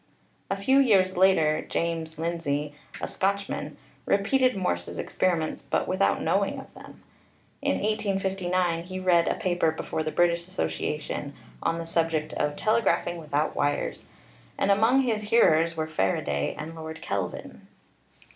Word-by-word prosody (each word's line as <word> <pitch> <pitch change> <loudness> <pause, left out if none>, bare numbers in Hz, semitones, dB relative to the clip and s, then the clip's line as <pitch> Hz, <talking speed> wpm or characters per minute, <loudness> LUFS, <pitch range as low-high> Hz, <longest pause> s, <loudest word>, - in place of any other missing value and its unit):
A 195 - -1
few 265 +8 +3
years 195 -8 +4
later 170 -5 +4
James 165 -1 -3
Lindsay, 155 -3 -2 0.3
a - - -3
Scotch 200 +1 0
man, 145 0 -5 0.3
repeated 250 +5 +2
Morse's 185 -2 -2
experiments, 170 -4 -1
but - - -1
without 190 +1 +1
knowing - - +1
of - - -12
them. - - -14 0.6
In - - +1
1859 190 -5 0
he 185 +1 -5
read 175 -2 +3
a - - +1
paper 175 -3 +1
before 160 0 -3
the 155 0 -2
British 170 0 +2
Asso 185 - -1
ciation 150 -1 -4 0.3
on 165 - 0
the 165 - -4
subject 165 -2 0
of 145 0 -1
"Telegraphing 215 -4 +1
without 150 -1 -1
Wires,'* 145 0 -1 0.5
and 200 - +2
among 225 +7 +4
his 215 -4 -1
hearers 165 -7 +4
were 155 - 0
Faraday 95 - -1
and 155 +2 -6
Lord 160 0 -8
Kelvin. 95 -3 -4
170 Hz, 145 wpm, -27 LUFS, 155-195 Hz, 0.6 s, years